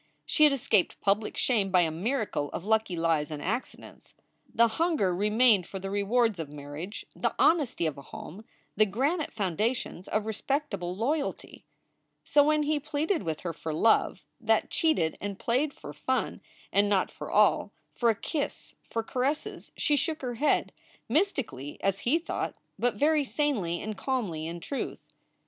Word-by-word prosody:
She 305 - +5
had 300 - +6
escaped 225 -8 +1
public 205 +2 +1
shame 215 -6 +2
by 185 -1 +5
a 165 -2 +1
miracle 200 - -1
of 180 - -5
lucky 220 -3 +1
lies 165 -3 +1
and 150 -2 -5
accidents. 225 - -5 0.4
The 235 0 +5
hunger 230 - +1
remained 210 -1 +4
for 195 - -6
the 195 0 -5
rewards 210 +1 +2
of 160 -3 -4
marriage, 150 +7 -7
the - - -1
hon 330 0 +5
esty 235 - -3
of 150 -3 -2
a - - -8
home, 180 +8 -9 0.3
the 215 +1 +4
granite 285 - 0
foundations 205 0 -2
of 215 0 -1
respectable 220 -6 -2
loyalty. 280 +8 -2 0.6
So 290 - +5
when 305 +1 +3
he 300 0 +1
pleaded 305 +5 -1
with 160 -4 -3
her 170 -2 -3
for 160 -1 -4
love 220 +7 +3 0.2
that - - +1
cheated 310 - +1
and 200 -1 -4
played 260 +8 +1
for - - -10
fun - - -1 0.3
and 200 +1 +4
not 195 -2 +2
for - - -8
all, - - +3 0.2
for 235 - +2
a 225 - +3
kiss, 290 +7 -4 0.2
for 230 - -1
caresses, 265 +6 -2
she 295 - +2
shook 310 +1 -1
her 245 -1 -2
head 285 +6 +1 0.4
mystically 250 - -1
as 195 0 +1
he 270 +7 +2
thought, 335 - -3 0.2
but 245 0 +1
very 300 +1 +3
sanely 245 - 0
and 215 -2 -5
calmly, 195 - -2
in 170 +1 -6
truth. 275 - -4
220 Hz, 165 wpm, -28 LUFS, 180-280 Hz, 0.6 s, had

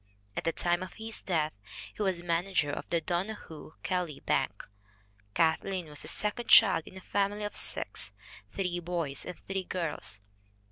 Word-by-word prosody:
At - - -3
the 165 - +3
time 175 +1 +1
of 185 - -6
his 220 0 -7
death 160 -4 0 0.4
he - - -7
was 185 -4 +1
manager 170 -3 +1
of - - -5
the 170 -1 +2
Donohoe 175 -3 -4
Kelly 175 -6 -1
Bank. - - 0 0.7
Kathleen 165 +1 +1
was 150 -1 -6
the - - -3
second 210 +7 +1
child 195 -7 +8
in 190 - -10
a - - -9
family 205 +2 0
of 205 - -4
six - - +1 0.4
three 180 -3 -1
boys 170 -5 -2
and 180 - -6
three 195 -1 -1
girls. 160 - -3
175 Hz, 160 wpm, -31 LUFS, 160-195 Hz, 0.7 s, child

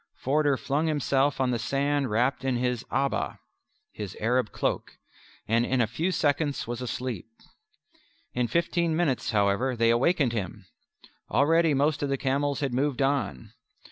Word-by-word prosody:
Forder 145 0 +1
flung 145 +5 -1
himself 145 -2 +1
on 130 -1 +2
the 120 - -1
sand 140 +3 0
wrapped 125 +4 +1
in 130 -1 0
his 125 -1 -1
abba 140 0 -1 0.5
(his 105 -3 -7
Arab 120 0 +1
cloak) - - -2 0.5
and 115 +2 +3
in 130 +1 0
a 120 - +4
few 155 - -2
seconds 145 -3 0
was 120 +1 -5
asleep. 125 -4 -4 1.1
In 125 -1 0
fifteen 170 +2 +1
minutes, 155 -7 0
however, 105 +4 +1
they 115 0 +3
awakened 135 +1 +2
him. 100 -2 -4 0.6
Already 155 +5 +3
most 145 +2 +1
of 145 - -1
the 135 - 0
camels 140 +2 0
had 135 -3 -1
moved 135 +1 0
on. 135 - -1
135 Hz, 150 wpm, -27 LUFS, 120-145 Hz, 1.1 s, a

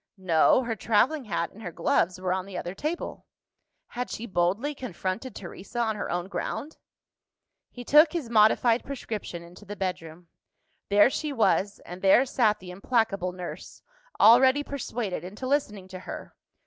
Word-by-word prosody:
No: 185 +6 +3
her 230 -2 -2
travelling 240 +7 +1
hat 170 -5 -2
and 220 - -14
her 175 - -6
gloves 170 +2 +1
were 185 -1 -1
on 190 0 -3
the 190 -2 -7
other 175 0 -4
table. 305 - -5 0.6
Had 250 +1 -4
she 230 - -5
boldly 200 +8 0
confronted 230 -1 -5
Teresa 195 +5 -9
on 225 -2 +1
her 210 - -4
own 175 +1 -2
ground? 280 - -5 0.9
He 245 - -9
took 300 +5 +6
his 335 -8 -3
modified 230 +1 +4
prescription 215 -10 -6
into 175 +4 -14
the 205 +1 -7
bedroom. 175 -3 -5 0.6
There 205 +5 +5
she 305 +1 -3
was, 210 -5 +1
and 180 +1 -9
there 195 +7 +5
sat 225 -5 +2
the 180 -1 -10
implacable 195 -2 0
nurse, 180 -1 -9 0.4
already 260 +6 +6
persuaded 240 -10 -4
into 205 +8 -7
listening 210 -9 -1
to 185 -1 -8
her! - - -8
210 Hz, 160 wpm, -27 LUFS, 185-250 Hz, 0.9 s, took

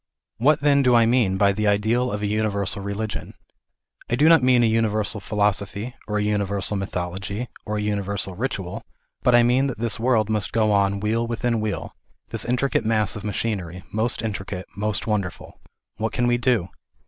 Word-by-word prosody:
What 140 +5 +3
then 140 -1 +4
do 125 -2 +4
I 115 -1 +5
mean 115 -5 +2
by 100 +1 +4
the 105 +2 -1
ideal 110 +5 +1
of 105 0 -3
a - - +1
universal 100 -2 -1
relig 100 +1 -3
ion? - - -7 0.7
I 120 - +2
do 145 +5 +4
not 165 -3 +7
mean 125 -1 +4
a - - +5
universal 110 -2 +1
philosophy, 105 +2 -1
or 105 -1 -1
a 105 - 0
universal 100 -1 0
mythology, 95 +4 -4 0.2
or 105 0 -2
a - - -1
universal 100 -2 0
ritual, 100 -5 -4 0.4
but 125 - +4
I 120 - +6
mean 125 +3 +3
that 130 - -4
this 115 0 -1
world 115 -3 +2
must 105 -3 -1
go 110 -2 +2
on 100 -1 +2
wheel 115 +3 0
within 115 0 -1
wheel, 110 -2 -3 0.4
this - - -3
intricate 125 +3 0
mass 110 -1 +2
of 105 - -7
machinery, 95 -4 -3
most 110 +2 -1
intricate, 95 -3 -4
most 105 +1 -2
wonderful. 100 -5 -4 0.4
What 110 +1 -2
can 120 - +1
we 120 0 +2
do 115 -7 +1
105 Hz, 185 wpm, -23 LUFS, 100-120 Hz, 0.7 s, not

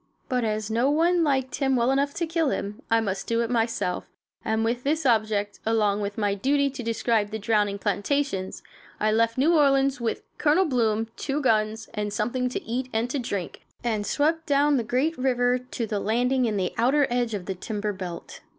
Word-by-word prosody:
But, 250 -2 0
as 215 -1 -2
no 235 +5 +2
one 335 +3 +3
liked 265 -4 0
him 270 -2 +1
well 240 +1 +2
enough 280 +1 +1
to 340 - -1
kill 325 -2 0
him, 205 -4 -4
I 225 - +4
must 195 -3 -3
do 230 0 +1
it 235 +1 -2
myself; 225 -6 -1 0.3
and 220 0 0
with 240 +2 -1
this 310 +2 0
object, 215 -4 +1
along 210 -2 +1
with 200 0 -4
my 205 -2 +1
duty 280 +7 +1
to 265 -1 -7
describe 225 -2 0
the 220 - -4
drowning 210 -1 +1
plantations, 205 0 -1 0.4
I 215 0 +2
left 230 +1 +2
New 300 +6 +4
Orleans 275 -3 +3
with 230 - -2 0.2
Colonel 320 +5 +4
Bloom, 225 -6 +1
two 275 - -3
good 295 - -1
guns, 220 -2 +1
and 210 -1 -2
something 245 +5 -1
to 250 - -4
eat 250 +3 -3
and 230 +2 -1
to 280 - -1
drink, 200 -7 -4 0.2
and 220 -3 0
swept 320 +8 0
down 285 0 +3
the 240 - 0
great 260 +8 0
river 250 -1 +2
to 250 -2 -5
the 210 -2 -2
landing 245 +5 +1
in 215 -3 0
the 185 -2 -1
outer 275 +5 +4
edge 240 -2 0
of 190 -3 -5
the 190 - -2
timber 210 +2 -3
belt. 180 -3 -7
235 Hz, 205 wpm, -25 LUFS, 215-270 Hz, 0.4 s, I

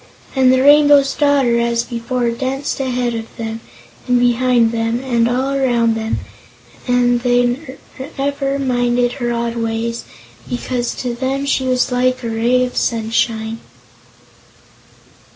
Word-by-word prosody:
And 260 -1 +4
the 260 0 +3
Rainbow's 290 -1 +6
Daughter, 275 -5 +2
as 235 0 0
before, 240 0 -2
danced 265 +4 -3
ahead 250 -2 -1
of 225 -1 -5
them 225 0 -5 0.5
and 250 -1 +3
behind 245 -1 +3
them 230 +1 -1
and 235 -3 +1
all 260 +3 0
around 240 -4 +2
them, 225 0 -2 0.7
and 245 -1 +2
they 245 +3 +1 0.5
never 275 0 -1
minded 245 -2 +1
her 240 -2 -3
odd 235 0 -2
ways, 230 0 -2 0.5
because 245 0 -3
to 245 -2 -3
them 265 +3 -2
she 275 -1 0
was 255 0 +1
like 255 0 0
a 230 - -3
ray 240 +3 +2
of 250 - -7
sunshine. 225 0 -1
245 Hz, 135 wpm, -17 LUFS, 235-260 Hz, 0.7 s, Rainbow's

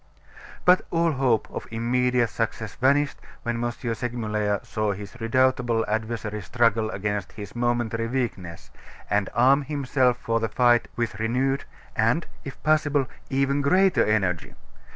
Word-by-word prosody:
But 180 +1 +6
all 165 -1 +2
hope 130 -5 +1
of - - -6
immediate 120 0 +1
success 110 -1 -3
vanished 140 +2 +2 0.3
when 120 0 -2
M. 120 - 0
Segmuller 115 -4 -2
saw 110 -2 -1
his 100 +3 -9
redoubtable 120 -1 +2
adversary 110 0 -3
struggle 115 +1 +1
against 105 -1 -3
his 100 0 -9
momentary 120 -1 0
weakness, 95 -11 -4 0.4
and 100 -1 +1
arm 135 +4 +5
himself 135 -3 +1
for 115 -2 -1
the 115 -1 -1
fight 120 +1 +3
with 115 -3 -2
renewed, 130 +5 0 0.3
and, 115 +10 +2 0.2
if 140 - -9
possible, 145 -2 +2 0.2
even 135 +1 +1
greater 185 +6 +4
energy. 95 -6 0
120 Hz, 130 wpm, -25 LUFS, 110-130 Hz, 0.4 s, But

